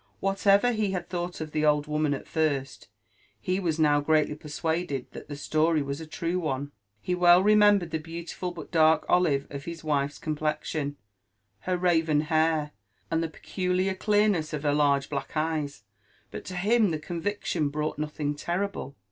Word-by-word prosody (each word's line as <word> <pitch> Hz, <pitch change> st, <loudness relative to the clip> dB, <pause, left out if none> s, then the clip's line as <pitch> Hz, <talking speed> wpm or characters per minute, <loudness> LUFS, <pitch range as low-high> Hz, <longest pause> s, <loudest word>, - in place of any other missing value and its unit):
What 195 Hz, +1 st, -2 dB
ever 200 Hz, +5 st, +6 dB
he 215 Hz, -4 st, 0 dB
had 175 Hz, -2 st, -3 dB
thought 175 Hz, -1 st, -4 dB
of 155 Hz, -1 st, -5 dB
the 155 Hz, 0 st, -1 dB
old 150 Hz, -1 st, +3 dB
woman 150 Hz, -1 st, 0 dB
at -, -, -9 dB
first, 145 Hz, -4 st, -1 dB, 0.5 s
he 185 Hz, -, -1 dB
was 165 Hz, -5 st, -1 dB
now 145 Hz, -2 st, +3 dB
greatly 155 Hz, 0 st, +2 dB
persuaded 150 Hz, -2 st, -3 dB
that -, -, -10 dB
the 145 Hz, -, -5 dB
story 155 Hz, +1 st, +1 dB
was 140 Hz, +2 st, -4 dB
a 160 Hz, -, -8 dB
true 170 Hz, +3 st, -2 dB
one; 145 Hz, -3 st, -3 dB, 0.3 s
he 180 Hz, -, -2 dB
wel 180 Hz, 0 st, +6 dB
remembered 205 Hz, -4 st, +5 dB
the 160 Hz, -, -1 dB
beautiful 170 Hz, +3 st, -6 dB
but 170 Hz, -3 st, -9 dB
dark 160 Hz, -2 st, +4 dB
olive 155 Hz, -6 st, +2 dB
of 140 Hz, 0 st, -7 dB
his 170 Hz, -1 st, -7 dB
wife's 145 Hz, -2 st, 0 dB
complexion, 150 Hz, -1 st, -2 dB, 0.7 s
her 180 Hz, -, +2 dB
raven 165 Hz, -4 st, +2 dB
hair, 155 Hz, -1 st, +1 dB, 0.4 s
and 165 Hz, 0 st, +1 dB
the 165 Hz, -, -2 dB
peculiar 185 Hz, +3 st, -1 dB
clearness 205 Hz, -5 st, +1 dB
of 150 Hz, -1 st, -3 dB
her 145 Hz, -1 st, +2 dB
large 140 Hz, -2 st, +2 dB
black 140 Hz, +1 st, -4 dB
eyes; 155 Hz, -7 st, -2 dB, 0.5 s
but -, -, -7 dB
to 185 Hz, -, -6 dB
him 210 Hz, +3 st, +3 dB
the 160 Hz, -, -1 dB
convic 175 Hz, +6 st, -4 dB
tion 155 Hz, -4 st, 0 dB
brought 150 Hz, +1 st, -3 dB
nothing 150 Hz, -1 st, -2 dB
terrible. 175 Hz, -2 st, -3 dB
160 Hz, 175 wpm, -27 LUFS, 150-180 Hz, 0.7 s, ever